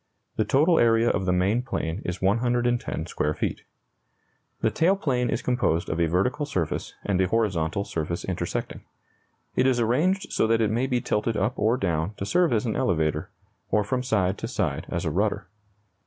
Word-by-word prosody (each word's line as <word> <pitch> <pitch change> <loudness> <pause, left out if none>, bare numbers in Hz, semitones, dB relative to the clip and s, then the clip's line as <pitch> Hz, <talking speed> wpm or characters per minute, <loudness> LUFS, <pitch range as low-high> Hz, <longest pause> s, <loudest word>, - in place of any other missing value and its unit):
The 110 - +1
total 155 - +4
area 115 0 +4
of 95 - -2
the - - +3
main 95 +6 +2
plane 95 -7 -3
is 90 +1 -4
110 120 -3 +1
square 75 -2 -1
feet. - - -2 1.0
The 110 - +2
tail 165 - +3
plane 125 -10 0
is - - -1
composed 120 -10 0
of 80 - -2
a 85 - +3
vertical 125 - 0
surface 95 - -3
and 95 -2 +1
a 95 - +2
horizontal 95 -4 0
surface 85 +1 -3
intersecting. - - -3 0.7
It 130 - +3
is 125 -2 +2
arranged 155 - +1
so - - +2
that 115 0 +3
it 110 -2 +2
may 120 +4 0
be 125 -2 0
tilted 110 +1 -1
up 110 +6 +1
or 110 +4 +2
down 90 0 -1
to 100 - -4
serve 175 - +2
as 115 0 +1
an 110 - -1
elevator, 80 -4 0 0.4
or 105 +1 +2
from 125 +5 -1
side 100 -6 0
to 115 - -3
side 95 - -2
as - - -2
a - - 0
rudder. - - 0
110 Hz, 185 wpm, -25 LUFS, 90-125 Hz, 1.0 s, total